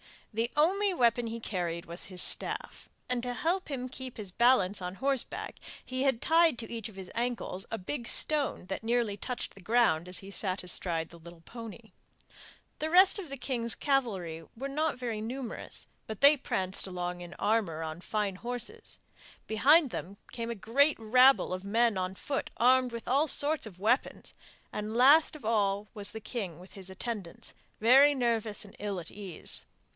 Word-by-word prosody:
The 230 +2 0
only 385 +6 +3
weapon 240 -3 +2
he 230 +1 -5
carried 175 -4 -3
was 170 +2 -6
his 185 -2 -1
staff, - - -1 0.2
and 250 -1 0
to 245 0 -3
help 345 +10 0
him 255 -3 -4
to 255 - -11
keep 260 -2 -6
his 205 -4 -4
balance 205 -3 +3
on 180 +1 -5
horseback 270 +2 -3 0.3
he 260 +1 -2
had 265 -4 +1
tied 325 -4 +4
to 225 -2 -6
each 230 -3 -4
of 210 - -15
his 190 -2 -9
ankles 235 -5 -3
a 225 - -3
big 235 +5 -4
stone 295 -10 +2
that 190 +4 -4
nearly 230 -2 +1
touched 250 +4 -5
the 195 - -14
ground 180 -5 +2
as 180 - -2
he 195 0 -11
sat 190 -2 -1
astride 170 -2 -2
the 170 - -14
little 170 0 -13
pony. 230 +2 -10 0.9
The 310 - -1
rest 370 +4 +6
of 355 -6 -7
the 275 - -6
king's 235 -3 -1
cavalry 195 - -1
were 270 +4 -5
not 305 +1 -1
very 235 -4 -3
numerous, 245 +2 -4 0.2
but 220 -2 -7
they 285 +2 +8
pranced 190 -7 -2
along 180 -1 -4
in 175 0 -9
armour 200 -8 0
on 160 +2 -6
fine 205 -1 -2
horses. 245 - -5 0.5
Behind 275 +6 +4
them 195 +4 -6
came 230 -1 -4
a 235 - -3
great 275 +9 +2
rabble 250 0 +5
of 185 +1 -5
men 230 +2 +2
on 185 0 -2
foot 275 +7 -3
armed 255 +1 +4
with 235 - -7
all 280 +5 +3
sorts 290 -2 +3
of 180 -4 -13
weapons, 225 +7 0 0.4
and 210 +1 -4
last 285 +7 +6
of 305 - -11
all 205 -2 +1
was 205 -2 -3
the 220 - -6
king 205 -7 -5
with 180 +2 -14
his 190 -1 -7
attendants, 195 -2 -6 0.3
very 270 +6 +7
nervous 230 -5 -1
and 200 - -15
ill 200 -2 -3
at 170 - -9
ease. 195 -5 -1
230 Hz, 185 wpm, -30 LUFS, 190-260 Hz, 0.9 s, they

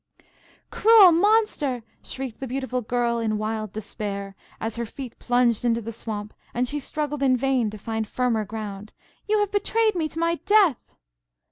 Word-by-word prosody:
"Cruel 430 -4 +7
monster!" 340 - +2 0.2
shrieked 260 -4 -6
the 265 - -4
beautiful 255 0 -2
Girl 235 0 0
in 220 -2 0
wild 215 -1 -3
despair, 200 -2 -5 0.2
as 225 0 -3
her 235 0 -3
feet 255 +1 -9
plunged 245 -2 +2
into 230 -1 +2
the 230 0 -6
swamp, 215 -2 -6 0.2
and 250 +1 +1
she 295 +3 -2
struggled 295 0 -3
in 260 -2 +3
vain 255 -3 +1
to 215 - -8
find 220 +1 -3
firmer 240 -2 0
ground, 210 -1 -7 0.3
"you 430 +1 +3
have 415 -1 0
betrayed 435 +2 +2
me 325 -4 -1
to 320 - -12
my 335 -1 0
death!" 405 - +3
245 Hz, 165 wpm, -24 LUFS, 220-300 Hz, 0.3 s, Cruel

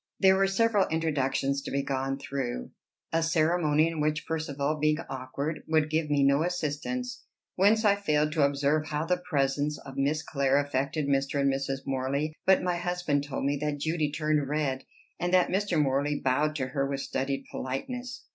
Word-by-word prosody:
There 190 -1 +6
were 195 0 +3
several 205 0 +2
introductions 140 -3 0
to - - -6
be 140 0 -1
gone 135 0 -2
through, 130 - -4 0.4
a 165 - +3
ceremony 160 -1 +2
in 165 -1 -4
which 150 0 0
Percivale, 155 -2 -2
being 155 0 +2
awkward, 140 +4 -4
would 155 -1 +2
give 155 -1 0
me 145 -1 +3
no 140 +2 +4
assistance; 180 - -2 0.3
whence 215 +4 +4
I 200 -1 +5
failed 150 -6 +1
to 155 -1 0
observe 145 +2 +1
how 150 +1 -2
the 180 +1 0
presence 145 +1 +1
of 135 0 -11
Miss 145 +3 +1
Clare 140 -2 +1
affected 145 +1 -1
Mr. 140 0 +1
and 140 -1 +3
Mrs. 135 0 -3
Morley; 140 +3 -1
but 190 -1 +5
my 180 -1 0
husband 175 -5 -1
told 135 -1 -3
me 145 +1 +1
that 150 -1 -1
Judy 155 0 -1
turned 150 -2 0
red, 145 -3 -1 0.3
and 175 0 -1
that 180 - +4
Mr. 190 -3 +1
Morley 145 +1 +1
bowed 145 +4 +1
to 130 -3 -2
her 135 +1 -1
with 140 -1 -2
studied 135 +1 -2
politeness. 245 - -5
150 Hz, 180 wpm, -28 LUFS, 140-165 Hz, 0.4 s, There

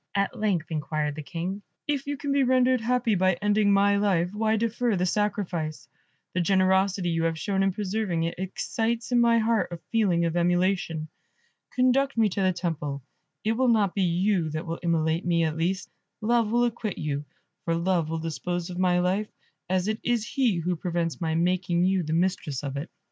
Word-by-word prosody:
at 200 -1 0
length 185 -7 -1
inquired 150 -1 -2
the 155 - -6
King. 180 +6 -4 0.3
"If 285 -2 -1
you 285 0 -2
can 285 0 -3
be 280 0 +3
rendered 255 -1 +3
happy 240 -1 +1
by 185 0 +3
ending 205 +2 +2
my 200 0 +4
life, 185 -4 +1
why 220 +1 +1
defer 230 +1 0
the 180 0 +1
sacrifice? 175 - -2 0.5
The 180 - +1
generosity 190 0 +2
you 165 0 0
have 165 -1 0
shown 195 +3 -1
in 195 0 +2
preserving 195 -3 -1
it, 165 - -1
excites 225 +5 -2
in 245 - +4
my 235 0 +4
heart 225 -4 +1
a 170 - -4
feeling 190 -7 +2
of 165 0 -1
emulation. 175 -2 +1 0.7
Conduct 255 +1 +2
me 220 -2 +4
to 195 - -2
the 185 -1 +3
temple, 155 -6 -3 0.4
it 220 - +1
will 255 +3 +1
not 210 -5 +3
be 200 - -1
you 180 -1 +1
that 155 +3 -4
will 165 0 -4
immolate 165 -1 +1
me, 170 -1 +2
at 155 -1 0
least; 180 +3 -1 0.3
Love 230 -1 +1
will 240 +1 +3
acquit 225 -3 -3
you, 145 -2 -2 0.4
for 165 - +1
Love 170 -2 0
will 165 - -2
dispose 170 +2 -3
of 180 - -6
my 180 -1 +3
life, 185 +4 +1 0.4
as 185 +1 +1
it 215 +1 -1
is 240 -2 0
he 250 -7 +1
who 175 +2 -1
prevents 170 0 -2
my 160 -1 0
making 175 0 +1
you 190 0 +2
the 155 -2 -4
mistress 165 -5 0
of 140 -1 -4
it." 140 +5 -4
185 Hz, 195 wpm, -26 LUFS, 170-215 Hz, 0.7 s, my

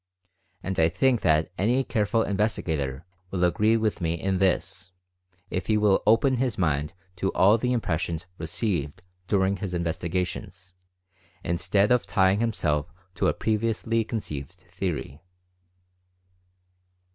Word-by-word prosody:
And 95 +1 -2
I 80 0 +5
think 130 +5 +2
that 80 -1 +2
any 120 +7 +2
careful 115 -1 +1
investigator 80 - -1 0.2
will 90 -1 -1
agree 105 +6 +3
with 110 -3 -1
me 85 0 0
in 95 +2 -1
this, 95 0 0 0.6
if 90 -1 -3
he 110 - +3
will 105 -2 +3
open 125 +4 +4
his 125 -3 -1
mind 75 -1 0 0.2
to 95 +2 0
all 105 +5 +5
the 125 +2 0
impressions 85 -7 -1
received 85 - -2 0.2
during 100 -1 +2
his 90 -1 -4
investigations, 90 +2 -3 0.7
instead 95 +5 +1
of 125 -1 +3
tying 95 -1 +3
himself 85 -9 0 0.2
to 100 - 0
a - - +2
previously 115 +1 0
conceived 85 - -5
theory. 90 -5 -5
95 Hz, 125 wpm, -26 LUFS, 85-110 Hz, 0.7 s, I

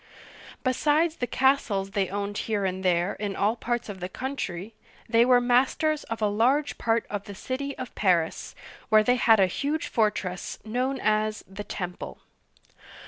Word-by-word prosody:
Besides 300 +5 +2
the 245 - -2
castles 240 -9 +1
they 195 -2 0
owned 200 +1 -3
here 205 -3 0
and 190 0 -2
there 180 +1 +2
in 205 -2 -4
all 210 +3 +1
parts 240 0 -2
of 200 -3 -7
the 180 +1 -4
coun 265 +7 -4
try, 190 -3 -5 0.4
they 230 0 +5
were 250 -1 +6
masters 260 +5 +2
of 225 -1 -4
a - - +4
large 250 +8 +1
part 230 0 +1
of 205 -1 -4
the 200 - -8
city 275 +6 -4
of 255 - -7
Paris, 175 -5 0 0.3
where 215 -1 +6
they 245 +3 +3
had 225 -3 +5
a 190 - +6
huge 285 - -2
fortress 200 -5 -1
known 255 +4 -1
as 215 0 0
" - - -39
the 195 +2 -7
Temple.' 180 -3 -6
215 Hz, 175 wpm, -26 LUFS, 195-255 Hz, 0.4 s, were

